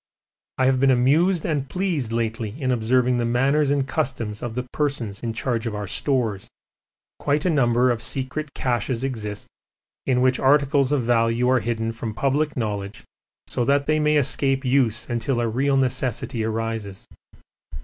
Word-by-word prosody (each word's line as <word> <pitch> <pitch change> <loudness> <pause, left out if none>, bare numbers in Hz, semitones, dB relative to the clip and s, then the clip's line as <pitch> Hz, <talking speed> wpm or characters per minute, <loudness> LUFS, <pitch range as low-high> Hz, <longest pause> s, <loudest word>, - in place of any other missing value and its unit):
I 130 - +2
have 130 -1 +3
been 135 +1 +4
amused 150 +8 +3
and 145 -4 -1
pleased 175 - -1
lately 115 +1 -3
in 130 -3 0
observing 125 +1 +2
the 120 - 0
manners 135 +5 +2
and 140 -1 +1
customs 115 -6 -2
of 120 -2 -5
the 125 - -2
persons 125 -6 -3
in 115 - -2
charge 115 0 -2
of 110 - -3
our 105 0 -4
stores; 110 -2 -1 0.7
quite 145 +3 0
a 180 - +3
number 125 -3 +3
of 115 -2 -2
secret 140 +2 -3
caches 120 0 -1
exist 105 -6 -4 0.6
in 125 -2 +2
which 130 0 +2
articles 140 0 +3
of 145 -4 +1
value 115 +1 +2
are 130 - +4
hidden 115 -1 -2
from 115 -1 -6
public 145 +4 0
knowledge 105 -3 -4 0.4
so 120 - -2
that 140 +3 +2
they 155 +1 +2
may 150 0 +3
escape 135 0 +1
use 125 -4 +1
until 120 +2 -1
a 120 - 0
real 135 +5 +1
necessity 125 -2 -1
arises. 110 -3 -4
125 Hz, 165 wpm, -23 LUFS, 115-140 Hz, 0.7 s, been